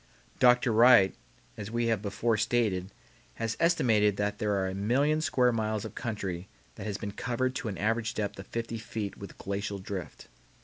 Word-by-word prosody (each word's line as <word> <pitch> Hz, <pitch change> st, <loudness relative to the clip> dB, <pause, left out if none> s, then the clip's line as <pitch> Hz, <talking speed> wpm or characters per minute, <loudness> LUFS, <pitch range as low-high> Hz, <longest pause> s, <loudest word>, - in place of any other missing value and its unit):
Dr. 125 Hz, -1 st, +5 dB
Wright 115 Hz, -3 st, +7 dB, 0.4 s
as 100 Hz, -, -6 dB
we 120 Hz, +1 st, 0 dB
have 115 Hz, -3 st, +1 dB
before 110 Hz, +3 st, 0 dB
stated 100 Hz, -4 st, 0 dB, 0.5 s
has 115 Hz, -1 st, -2 dB
estimated 110 Hz, -, +3 dB
that 105 Hz, 0 st, -1 dB
there 105 Hz, -1 st, +1 dB
are 95 Hz, -1 st, 0 dB
a 95 Hz, -, -3 dB
million 135 Hz, +10 st, +1 dB
square 130 Hz, -5 st, +3 dB
miles 110 Hz, -2 st, -1 dB
of 110 Hz, -, -7 dB
country 95 Hz, -6 st, -4 dB, 0.3 s
that -, -, -7 dB
has 100 Hz, -2 st, -2 dB
been 100 Hz, -, -5 dB
covered 125 Hz, +4 st, -1 dB
to -, -, -4 dB
an 100 Hz, -4 st, -4 dB
average 110 Hz, +3 st, 0 dB
depth 100 Hz, -2 st, -3 dB
of 95 Hz, -, -9 dB
fifty 115 Hz, -1 st, -4 dB
feet 105 Hz, -2 st, -5 dB
with 100 Hz, -, -10 dB
glacial 100 Hz, +1 st, -3 dB
drift. 95 Hz, -2 st, -7 dB
110 Hz, 180 wpm, -29 LUFS, 100-120 Hz, 0.5 s, Wright